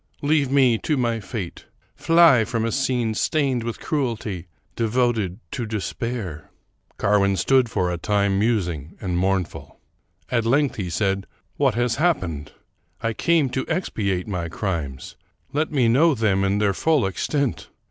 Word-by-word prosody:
Leave 145 -2 +2
me 130 -5 +4
to 150 - -1
my 120 -2 0
fate. 100 -4 -6 0.3
Fly 165 -8 +5
from 115 0 -2
a 115 - -1
scene 125 -4 0
stained 135 0 0
with 115 -1 -4
cruelty, 110 - -3 0.3
devoted 115 -5 0
to 120 -4 -3
despair." 110 - -4 0.5
Carwin 100 -1 +2
stood 130 0 +3
for 90 -5 0
a 85 - -3
time 100 +1 +1
musing 90 -9 -1
and 90 -3 -3
mournful. 95 0 -1 0.5
At 120 -2 +2
length 140 +5 +2
he 95 -4 -3
said, 95 +2 -1
" - - -43
What 135 -6 +2
has 120 +1 0
happened? 95 - 0 0.5
I 115 0 0
came 165 +4 +2
to 130 +1 -2
expiate 100 - -1
my 90 -5 -3
crimes: 80 -9 -4 0.4
let 155 +2 0
me 130 -6 +2
know 145 +7 +4
them 100 -4 +1
in 100 +1 +1
their 105 -1 +2
full 155 -1 +2
extent. 135 - -2
115 Hz, 150 wpm, -23 LUFS, 95-130 Hz, 0.5 s, Fly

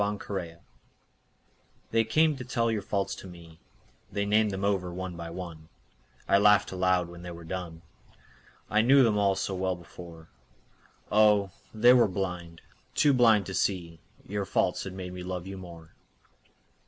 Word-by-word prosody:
Faults 100 -4 -3 1.4
They 115 0 +3
came 155 +7 +2
to 130 - -7
tell 115 -2 0
your 110 -2 -1
faults 100 0 -2
to - - -9
me, 85 -2 -14 0.5
They 100 0 -1
named 105 +1 +3
them 95 0 -3
over 95 -3 0
one 90 0 -5
by 85 0 -7
one; 85 -2 -8 0.6
I 100 - +4
laughed 105 +1 +4
aloud 90 -1 +1
when 85 0 -11
they 90 - -8
were 85 -1 -9
done, 85 -1 -6 0.8
I 105 - +3
knew 135 +4 +6
them 110 -3 +2
all 100 -1 +3
so 95 0 -3
well 95 0 -1
before, 85 -1 -13 0.8
Oh, 105 -2 +4 0.2
they 120 +3 +6
were 120 -3 +5
blind, 90 -3 -5 0.3
too 145 - +4
blind 115 -5 +4
to 95 - -6
see 85 -4 -1 0.3
Your 100 0 -2
faults - - 0
had 95 - -6
made 90 -1 -7
me 90 - -7
love 90 -1 -5
you 95 0 -7
more. 85 -3 -12
95 Hz, 165 wpm, -28 LUFS, 85-105 Hz, 1.4 s, knew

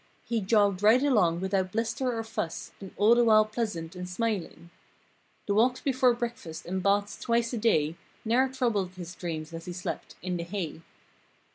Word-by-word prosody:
He 230 -2 -1
jogged 200 -1 +2
right 225 +5 +5
along 185 -12 +3
without 190 -1 0
bluster 230 +3 -1
or 225 - -2
fuss 195 -6 -4
And 195 - -8
all 215 +3 +6
the 240 0 +4
while 215 -2 +6
pleasant 210 -6 -4
and 180 0 -6
smiling. 185 -4 -3 0.7
The 200 - 0
walks 245 +5 +3
before 255 -3 +2
breakfast 235 -9 -5
and 185 +2 -2
baths 200 +1 +1
twice 235 0 +1
a - - -1
day 165 -8 +2 0.3
Ne'er 250 +4 +3
troubled 225 -8 -1
his 175 -1 -7
dreams 165 -3 -5
as 165 0 -7
he 180 - -5
slept—"in 180 0 -5
the 170 - -3
hay." 170 -3 -5
205 Hz, 170 wpm, -28 LUFS, 180-235 Hz, 0.7 s, all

